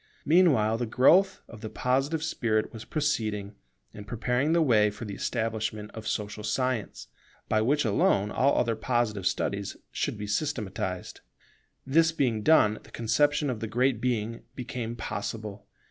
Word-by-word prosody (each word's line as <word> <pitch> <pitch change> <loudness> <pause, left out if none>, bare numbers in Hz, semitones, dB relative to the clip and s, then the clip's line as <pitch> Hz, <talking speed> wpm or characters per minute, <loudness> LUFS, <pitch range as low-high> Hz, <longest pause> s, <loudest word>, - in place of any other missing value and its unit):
Meanwhile, 140 -10 +4
the 120 - -1
growth 180 - +4
of 115 -2 -12
the 110 - -5
Positive 135 +7 0
spirit 115 -9 -1
was 115 -1 -8
proceeding, 110 -10 -1 0.4
and 105 -1 -10
preparing 125 +6 0
the 170 - +4
way 110 -7 +4
for 105 +3 -8
the 100 - -6
establishment 110 0 -3
of 110 -1 -7
Social 105 0 -3
Science, 120 0 -2 0.4
by 110 - +2
which 145 +5 +2
alone 100 -1 +2
all 140 +2 +2
other 115 -1 +1
Positive 110 -4 0
studies 100 -1 -2
should - - -2
be 105 - -5
systematized. 105 - -3 0.6
This 160 +4 +4
being 130 -9 0
done, 110 -6 +4
the - - -18
conception 145 +6 +1
of 115 - -5
the 115 - -4
Great 125 +3 +1
Being 115 -2 -1
became 120 -2 -5
possible. 105 -2 -5
115 Hz, 150 wpm, -28 LUFS, 105-135 Hz, 0.6 s, Meanwhile